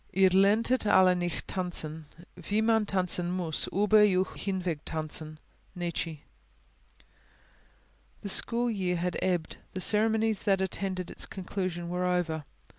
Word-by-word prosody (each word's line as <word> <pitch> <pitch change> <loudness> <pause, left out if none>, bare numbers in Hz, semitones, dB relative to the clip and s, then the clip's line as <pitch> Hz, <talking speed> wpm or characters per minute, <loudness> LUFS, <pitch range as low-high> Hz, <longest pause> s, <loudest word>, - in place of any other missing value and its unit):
IHR 190 -1 +4
LERNTET 215 +5 +3
ALLE 185 -2 +5
NICHT 175 -1 -3
TANZEN, 160 -4 -3 0.4
WIE 210 +1 +2
MAN 220 -1 +2
TANZEN 180 -2 +1
MUSS 175 -4 -1
UBER 210 +2 +4
EUCH 190 -2 +2
HINWEG 185 -6 -3
TANZEN! 155 0 -4 0.4
NIETZSCHE 170 -3 -4 2.0
The 200 - -3
school 235 +4 +4
year 185 -4 -1
had 175 +1 -2
ebbed; 175 -3 -1 0.2
the - - -2
ceremonies 220 +1 +2
that 195 -2 +2
attended 190 -1 -3
its - - -5
conclusion 185 -2 -4
were 180 +1 -1
over. 170 -4 -1
185 Hz, 125 wpm, -29 LUFS, 175-200 Hz, 2.0 s, ALLE